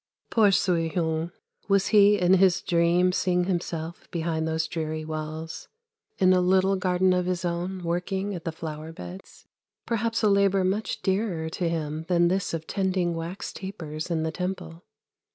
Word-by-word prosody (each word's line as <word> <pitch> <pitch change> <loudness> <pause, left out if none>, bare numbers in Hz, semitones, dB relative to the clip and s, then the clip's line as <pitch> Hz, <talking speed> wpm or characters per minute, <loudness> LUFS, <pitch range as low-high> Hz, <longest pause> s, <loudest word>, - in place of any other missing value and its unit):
Poor 215 -3 +5
Soui 170 -4 +2
houng! 160 -1 -1 0.4
was 200 -1 +2
he 205 -1 +6
in 180 +1 +4
his 190 -1 +4
dream 175 +1 +3
seeing 180 -1 +1
himself 170 -2 -4
behind 160 -1 -2
those 160 0 0
dreary 155 -1 -3
walls 155 +1 -5 0.5
in 185 -1 +5
a 180 - +4
little 190 +2 +3
garden 185 -1 +2
of 180 0 0
his 180 -1 -1
own 175 +2 -3
working 190 +4 -2
at 175 -3 -6
the 165 - -2
flower 160 0 -7
beds? 90 - -11 0.4
Perhaps 230 0 -1
a - - +5
labour 200 -1 +3
much 195 +4 -1
dearer 190 -5 0
to 170 +1 -2
him 160 -1 -3
than 175 -1 +3
this 190 +1 0
of 160 -1 -4
tending 185 -2 0
wax 165 +3 -5
tapers 165 -5 -6
in 165 -2 0
the 160 - -1
Temple. 180 -1 -5
175 Hz, 165 wpm, -26 LUFS, 160-190 Hz, 0.5 s, he